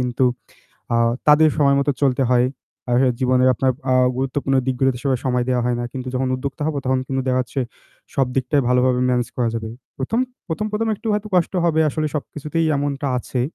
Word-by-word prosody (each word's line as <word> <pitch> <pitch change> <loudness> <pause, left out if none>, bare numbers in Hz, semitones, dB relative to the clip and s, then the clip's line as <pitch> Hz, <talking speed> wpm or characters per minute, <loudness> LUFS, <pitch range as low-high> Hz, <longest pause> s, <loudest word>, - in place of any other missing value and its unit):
কিন্তু 125 +1 0 0.7
আ - - +3 0.3
তাদের 155 +1 +6
সময় 140 -2 +4
মতো 140 +1 +1
চলতে 135 0 +2
হয়। 125 0 +4 0.7
জীবনে 130 -1 +2
আপনার 130 +2 +1 0.2
আ - - +4 0.2
গুরুত্বপূর্ণ 135 +1 -1
দিকগুলোতে 130 -1 +1
সময়, 130 -3 +1
সময় 125 -1 +1
দেওয়া 125 -1 +1
হয় 120 -1 0
না। - - -2
কিন্তু 130 -1 -5
যখন 130 0 0
উদ্যোক্তা 135 +2 -6
হব 155 - -2
তখন 130 0 +2
কিন্তু 135 0 -1
দেখা 130 0 +2
যাচ্ছে 125 +3 -3 0.5
সব 135 -2 +2
দিকটাই 135 +2 +1
ভালোভাবে 125 0 +3
ম্যানেজ 125 -1 0
করা 120 -2 +1
যাবে। 110 -1 -4 0.3
১ম 140 - -1 0.3
১ম 165 +5 -2
১ম 225 +2 -1
একটু 225 - -8
হয়তো 210 +1 -2
কষ্ট 180 +1 +2
হবে 160 -1 +2
আসলে 155 +1 -1
সবকিছুতেই 150 +2 -2
এমনটা 140 0 -2
আছে। 125 0 -3
130 Hz, 185 wpm, -21 LUFS, 125-145 Hz, 0.7 s, তাদের